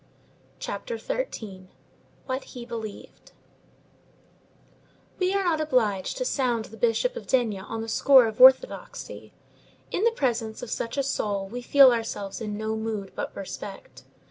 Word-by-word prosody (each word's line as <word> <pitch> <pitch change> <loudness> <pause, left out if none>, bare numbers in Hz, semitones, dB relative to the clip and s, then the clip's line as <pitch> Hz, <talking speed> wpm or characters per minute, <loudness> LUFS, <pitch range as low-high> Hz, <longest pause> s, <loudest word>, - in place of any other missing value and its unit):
CHAPTER 475 -2 -5
XIII—WHAT 260 - -7
HE 245 -2 -9
BELIEVED 225 -3 -8 1.9
We 365 0 +2
are 395 - +1
not 330 -4 +1
obliged 225 - 0
to - - -2
sound 245 - 0
the 225 - -13
Bishop 240 - +1
of 480 - -8
D—— 230 -6 +1
on 225 +3 -5
the 225 - -5
score 260 +2 +6
of 220 +1 -3
orthodoxy. 265 - +4 0.6
In 390 - -1
the 465 - +6
presence 235 - -2
of 245 - -7
such 230 +4 -3
a 275 - +2
soul 205 -7 -2
we 245 +5 -6
feel 270 +1 +7
ourselves 225 -3 -3
in 210 -2 -4
no 220 0 -2
mood 220 -3 -4
but - - -5
respect. 195 0 -8
235 Hz, 145 wpm, -26 LUFS, 215-275 Hz, 1.9 s, feel